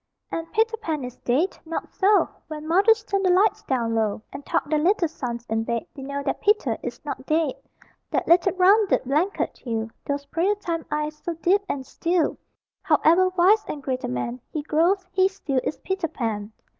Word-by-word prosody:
And 330 0 -4
Peter 450 +1 +1
Pan 320 - -3
is 250 -1 -7
dead? 290 +10 0
Not 330 0 -5
so! 405 +1 +4 0.2
When 310 0 -7
mothers 405 +6 +4
turn 395 -3 -1
the 375 - +2
lights 415 +4 +3
down 240 - -1
low 220 -1 0
And 275 +1 -7
tuck 285 - -1
their 305 0 +1
little 355 +2 +3
sons 240 -6 -5
in 225 0 0
bed, 235 0 -2
They 275 - -8
know 280 +1 -4
that 275 - -2
Peter 420 +1 +2
is - - -7
not - - -5
dead.... 310 -3 +2 0.6
That - - -1
little 340 0 +5
rounded 390 +2 +4
blanket 305 +10 -1
hill; 225 -2 -3 0.2
Those 285 0 -2
prayer 345 +8 +1
time 335 -5 -4
eyes, 300 0 -3
so 345 - -3
deep 360 +5 +2
and 265 -2 -3
still 335 +3 0 0.4
However 370 +4 +4
wise 410 +5 +5
and 290 -2 -5
great 260 -1 -2
a - - -1
man 125 0 -3
He 305 - -3
grows, 345 +6 +2
he 375 0 +4
still 315 -9 -2
is - - -2
Peter 380 -3 -2
Pan. 225 -8 -3
320 Hz, 195 wpm, -24 LUFS, 265-380 Hz, 0.6 s, little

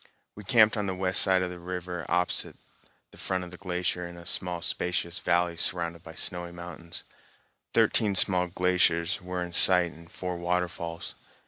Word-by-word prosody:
We 105 - -11
camped 110 +2 +4
on 105 -1 -1
the 95 - -2
west 95 +1 +3
side 95 -1 +4
of 90 - -3
the 90 - -9
river 90 -1 -6
opposite 90 +1 -1 0.5
the - - -15
front 95 -1 -2
of 90 - -10
the 90 - -10
glacier, 90 -2 -3
in 85 0 -11
a 85 - -12
spacious 90 0 -1
valley 85 0 +1
surrounded 85 -1 +1
by 80 - -12
snowy 90 -1 -1
mountains. 85 -1 -9 0.7
Thirteen 105 -3 +3
small 90 -1 +4
glaciers 90 0 +1
were 90 0 -4
in 85 -1 -8
sight 90 -1 +6
and 85 +1 -15
four 90 -1 -5
waterfalls. 85 -1 -3
90 Hz, 165 wpm, -27 LUFS, 85-90 Hz, 0.7 s, sight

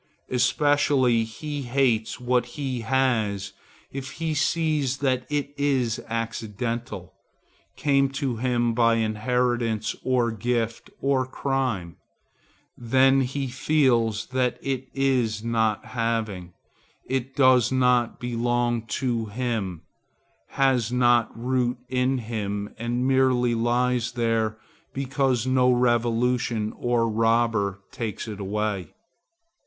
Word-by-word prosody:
Especially 130 -1 +3
he 145 +6 -6
hates 120 -4 0
what 125 0 +1
he 135 -4 -2
has 110 -6 0 0.4
if 135 0 -6
he 165 -1 -2
see 155 0 +1
that 130 -1 -1
it 145 -1 -2
is 130 -5 +1
accidental,—came 115 - -3
to 135 -3 -2
him 120 -1 +1
by 115 0 +3
inheritance, 115 0 0
or 125 -2 +1
gift, 115 0 -2
or 135 -2 +1
crime; 130 - -2 0.8
then 130 +3 +3
he 135 +2 -2
feels 120 -5 +1
that 130 -2 0
it 135 -1 -2
is 125 -6 +1
not 110 -2 0
having; 110 -7 -2 0.5
it 130 0 -3
does 130 -3 +5
not 125 -2 +2
belong 120 0 0
to 120 -4 -1
him, 105 -6 -3 0.7
has 130 -4 +1
no 120 -2 +4
root 125 +1 0
in 130 +1 +1
him 105 -3 -4
and 120 +2 -1
merely 130 -2 +3
lies 120 +1 +1
there 115 -2 0 0.4
because 135 -2 0
no 130 -1 +3
revolution 120 -2 +1
or 120 -1 0
no 115 - +2
robber 115 -3 +1
takes 115 -1 -5
it 105 -2 -6
away. 100 -1 -3
120 Hz, 105 wpm, -25 LUFS, 115-130 Hz, 0.8 s, does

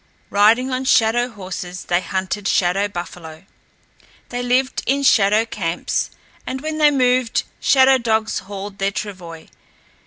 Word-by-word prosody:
Riding 225 +6 +4
on 255 +1 -2
shadow 240 0 +3
horses 185 -4 -7
they 175 +1 +1
hunted 190 +2 -3
shadow 195 +3 +2
buffalo. 175 -3 -8 0.8
They 245 0 -3
lived 255 +2 0
in 280 +2 +1
shadow 215 -3 +4
camps 175 -6 -2 0.4
and 260 - -3
when 310 +2 -4
they 300 -1 +6
moved 255 -3 +1 0.2
shadow 265 -1 +5
dogs 220 -2 0
hauled 200 +1 -8
their 195 0 +1
travois. 185 -6 -7
210 Hz, 130 wpm, -20 LUFS, 190-255 Hz, 0.8 s, they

